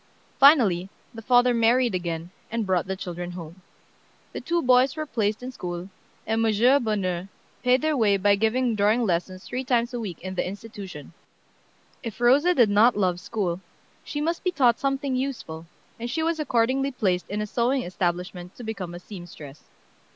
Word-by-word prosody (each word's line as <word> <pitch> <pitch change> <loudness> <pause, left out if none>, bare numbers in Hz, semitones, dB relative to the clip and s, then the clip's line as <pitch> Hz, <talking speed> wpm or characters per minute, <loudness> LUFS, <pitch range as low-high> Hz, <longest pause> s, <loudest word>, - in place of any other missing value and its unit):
Finally 220 - +5 0.2
the 225 - -8
father 245 +1 +4
married 235 0 +3
again 170 -1 -3 0.2
and 230 -1 -2
brought 185 -2 0
the 190 - -2
children 175 -2 -6
home. 175 +1 -9 0.7
The - - -5
two 340 0 0
boys 255 +1 +4
were 310 -1 -3
placed 220 -4 -1
in 255 - -5
school, 175 -5 -6 0.4
and 225 +1 0
M. 235 +5 +4
Bonheur 190 -5 -1 0.3
paid 255 +2 +3
their 310 -1 +2
way 210 -6 +3
by 200 +1 +3
giving 230 +4 +1
drawing 215 +3 +2
lessons 185 -1 -2
three 250 +2 -4
times 245 -1 0
a 245 - -3
week 200 -7 -5
in 185 +1 -5
the 185 - -1
institution. 195 -6 -9 0.9
If 230 -4 -7
Rosa 280 +9 +4
did 235 -7 +4
not 215 +3 +5
love 180 -3 +1
school, 185 -3 -3 0.4
she 295 - -5
must 335 +3 -1
be 365 - +2
taught 250 -9 +3
something 275 -1 -1
useful, 235 -12 -4 0.3
and 235 +1 -4
she 320 +6 -1
was 330 0 0
accordingly 265 0 +1
placed 190 -9 -1
in 205 - -3
a 210 - -1
sewing 245 +5 0
establishment 180 0 -3
to 245 - -10
become 195 -6 -5
a - - -7
seamstress. 175 -7 -11
220 Hz, 175 wpm, -25 LUFS, 185-250 Hz, 0.9 s, Finally